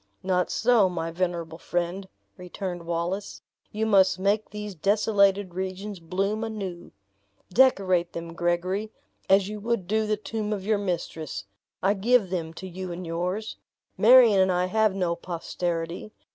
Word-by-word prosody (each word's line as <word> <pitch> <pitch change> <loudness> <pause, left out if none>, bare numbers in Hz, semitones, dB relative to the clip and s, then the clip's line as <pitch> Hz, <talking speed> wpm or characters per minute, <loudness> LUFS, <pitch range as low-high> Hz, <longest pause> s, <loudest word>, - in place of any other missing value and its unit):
"Not 180 -1 +1
so, 225 -5 +3
my 165 -2 -3
venerable 170 -2 -3
friend," 175 +3 -3 0.3
returned 180 -1 -6
Wallace; 175 +4 -3 0.3
"you 215 +1 -1
must 195 -4 +4
make 200 +3 0
these 210 -1 -6
desolated 200 0 +2
regions 190 +2 -5
bloom 195 +6 -2
anew! 195 -6 -5 0.6
Decorate 185 -8 +3
them, 170 0 -6
Gregory, 180 +5 -1 0.4
as 195 0 +5
you 210 0 -5
would 230 -3 -1
do 215 +3 0
the 215 0 +1
tomb 215 0 -3
of 195 -2 -5
your 215 -1 +2
mistress. 170 -5 -4 0.4
I 195 +2 +4
give 210 -1 +2
them 165 -3 -2
to 190 - -7
you 185 0 -6
and 175 +1 -6
yours. 180 +6 -3 0.4
Marion 235 -3 +7
and 190 0 +4
I 180 0 +1
have 215 +1 +2
no 180 -3 0
posterity! 170 +2 -4
190 Hz, 145 wpm, -26 LUFS, 175-210 Hz, 0.6 s, Marion